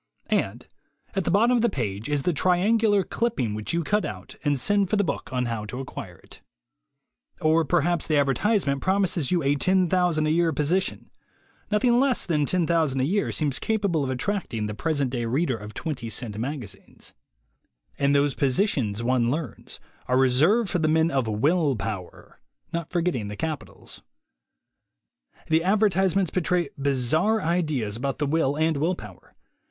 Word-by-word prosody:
And -, -, -1 dB, 0.5 s
at 195 Hz, -3 st, -1 dB
the -, -, 0 dB
bottom 230 Hz, +7 st, +4 dB
of 240 Hz, -, +2 dB
the 235 Hz, -, +3 dB
page 110 Hz, -, -4 dB
is 145 Hz, -2 st, 0 dB
the 180 Hz, -, +1 dB
triangular 200 Hz, +5 st, +2 dB
clipping 215 Hz, -, -1 dB
which 105 Hz, 0 st, -4 dB
you 170 Hz, 0 st, 0 dB
cut 210 Hz, +6 st, +1 dB
out 95 Hz, -2 st, -7 dB
and 145 Hz, -3 st, +1 dB
send 200 Hz, +5 st, +2 dB
for -, -, +1 dB
the 205 Hz, -, +2 dB
book 150 Hz, -7 st, -4 dB
on 125 Hz, -1 st, -1 dB
how 115 Hz, -3 st, -3 dB
to 125 Hz, +4 st, -6 dB
acquire 135 Hz, -, -8 dB
it. -, -, -16 dB, 1.0 s
Or 160 Hz, +1 st, +3 dB
perhaps 165 Hz, +3 st, +1 dB
the 155 Hz, -, +2 dB
advertisement 145 Hz, -, +1 dB
promises 190 Hz, -6 st, +1 dB
you 175 Hz, -4 st, +1 dB
a 140 Hz, +1 st, +3 dB
$10,000 180 Hz, -1 st, +2 dB
a -, -, +2 dB
year 165 Hz, 0 st, +2 dB
position. 165 Hz, +7 st, -1 dB, 0.6 s
Nothing 240 Hz, +3 st, +3 dB
less 265 Hz, -1 st, +2 dB
than 150 Hz, -5 st, 0 dB
$10,000 165 Hz, -6 st, +1 dB
a -, -, +1 dB
year 200 Hz, +7 st, 0 dB
seems 145 Hz, -4 st, 0 dB
capable 200 Hz, -8 st, 0 dB
of 135 Hz, -, -2 dB
attracting 130 Hz, -, -2 dB
the 105 Hz, -, -4 dB
present 140 Hz, +1 st, -1 dB
day 120 Hz, -2 st, -2 dB
reader 130 Hz, +3 st, 0 dB
of 105 Hz, -1 st, -9 dB
twenty 135 Hz, -8 st, -4 dB
cent 110 Hz, -2 st, -2 dB
magazines. 115 Hz, -4 st, -7 dB, 0.9 s
And 140 Hz, 0 st, +2 dB
those 140 Hz, 0 st, +2 dB
posi 140 Hz, +9 st, +2 dB
tions, 110 Hz, -, -2 dB
one 120 Hz, -1 st, +2 dB
learns, 145 Hz, -3 st, -5 dB, 0.3 s
are 125 Hz, -, +2 dB
reserved 155 Hz, -, +3 dB
for 180 Hz, -, 0 dB
the 155 Hz, -, +1 dB
men 160 Hz, +1 st, +2 dB
of 135 Hz, -5 st, 0 dB
Will 140 Hz, +7 st, +1 dB
Power 100 Hz, -3 st, -7 dB, 0.3 s
(not 170 Hz, -2 st, -3 dB
forgetting 170 Hz, -, -1 dB
the 105 Hz, -, -6 dB
capitals). 155 Hz, -3 st, -6 dB, 1.4 s
The 160 Hz, +1 st, +2 dB
advertisements 195 Hz, -2 st, +2 dB
betray 175 Hz, -3 st, 0 dB
bizarre 140 Hz, -, +1 dB
ideas 155 Hz, -, -1 dB
about 135 Hz, +4 st, -3 dB
the 150 Hz, -, -1 dB
will 145 Hz, -1 st, +1 dB
and 160 Hz, -1 st, +1 dB
will 165 Hz, +6 st, 0 dB
power. 105 Hz, -, -13 dB
155 Hz, 170 wpm, -25 LUFS, 130-180 Hz, 1.4 s, bottom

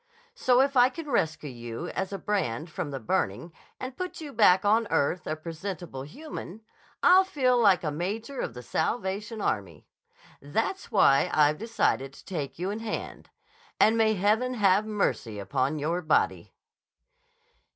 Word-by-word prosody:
So 250 Hz, 0 st, +3 dB
if 275 Hz, +1 st, +1 dB
I 250 Hz, 0 st, +6 dB
can 320 Hz, +3 st, -8 dB
rescue 160 Hz, -, 0 dB
you 120 Hz, +7 st, -6 dB
as 190 Hz, 0 st, -3 dB
a 195 Hz, -, -3 dB
brand 165 Hz, -, -2 dB
from 150 Hz, -, -4 dB
the 135 Hz, -1 st, -5 dB
burning 110 Hz, -, -2 dB, 0.3 s
and 255 Hz, 0 st, -6 dB
put 365 Hz, +4 st, -5 dB
you 300 Hz, -3 st, -8 dB
back 190 Hz, -4 st, +5 dB
on 220 Hz, +2 st, +3 dB
earth, 150 Hz, +5 st, 0 dB
a 155 Hz, -, -1 dB
presentable 165 Hz, -2 st, -6 dB
human, 215 Hz, -, -8 dB, 0.4 s
I'll 370 Hz, +2 st, +7 dB
feel 265 Hz, -9 st, +1 dB
like 195 Hz, -5 st, +4 dB
a 150 Hz, -, -1 dB
major 210 Hz, -, -4 dB
of 115 Hz, -, -3 dB
the 125 Hz, -, -8 dB
Salvation 205 Hz, -, -2 dB
Army. 95 Hz, -7 st, -3 dB, 0.6 s
That's 225 Hz, -, -2 dB
why 140 Hz, -10 st, +4 dB
I've 150 Hz, 0 st, +3 dB
decided 170 Hz, -, 0 dB
to -, -, -16 dB
take 150 Hz, -8 st, -5 dB
you 185 Hz, +4 st, -2 dB
in 210 Hz, -, -4 dB
hand. 225 Hz, -1 st, -6 dB, 0.5 s
And 220 Hz, -, +5 dB
may 220 Hz, -1 st, +3 dB
Heaven 220 Hz, +6 st, +1 dB
have 205 Hz, -1 st, +3 dB
mercy 195 Hz, -, -1 dB
upon 130 Hz, +9 st, -1 dB
your 165 Hz, +5 st, -1 dB
body!" 155 Hz, -, 0 dB
190 Hz, 160 wpm, -27 LUFS, 150-225 Hz, 0.6 s, I'll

